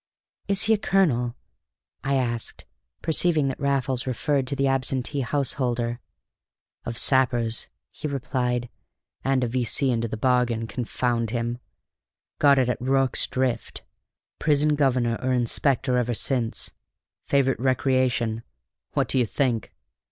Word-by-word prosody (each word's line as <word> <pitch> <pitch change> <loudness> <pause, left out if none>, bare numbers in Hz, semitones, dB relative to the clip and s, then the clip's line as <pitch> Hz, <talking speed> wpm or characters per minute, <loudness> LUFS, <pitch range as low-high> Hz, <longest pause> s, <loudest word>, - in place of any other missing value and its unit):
"Is 195 0 +1
he 220 - +4
a 215 - +1
colonel?" 125 - +2 0.7
I 140 0 +1
asked, 120 -3 -2 0.4
perceiving 160 -3 +2
that 135 - -5
Raffles 135 -1 0
referred 135 +2 0
to 140 - -1
the 140 - +1
absentee 135 +1 0
householder. 120 -3 -1 0.9
"Of 115 -1 -4
sappers," 120 -4 +2 0.2
he - - -5
replied, 125 -3 -2 0.5
"and 135 -1 +2
a - - +1
V.C. 125 +2 +1
into 115 -1 0
the 110 - -5
bargain, 120 -1 +1
confound 120 0 -1
him! 120 +1 -2 0.8
Got 140 -1 +6
it 130 -2 +3
at 125 - -1
Rorke's 135 0 +1
Drift; 130 -2 -2 0.6
prison 150 -1 +3
governor 125 -5 +1
or 130 0 0
inspector 125 +1 +1
ever 120 -1 -1
since; 120 -1 0 0.6
favorite 135 -1 +2
recreation, 130 -3 +1 0.5
what - - +1
do 130 - +1
you 120 - +2
think? 120 -3 -1
130 Hz, 130 wpm, -25 LUFS, 120-135 Hz, 0.9 s, Got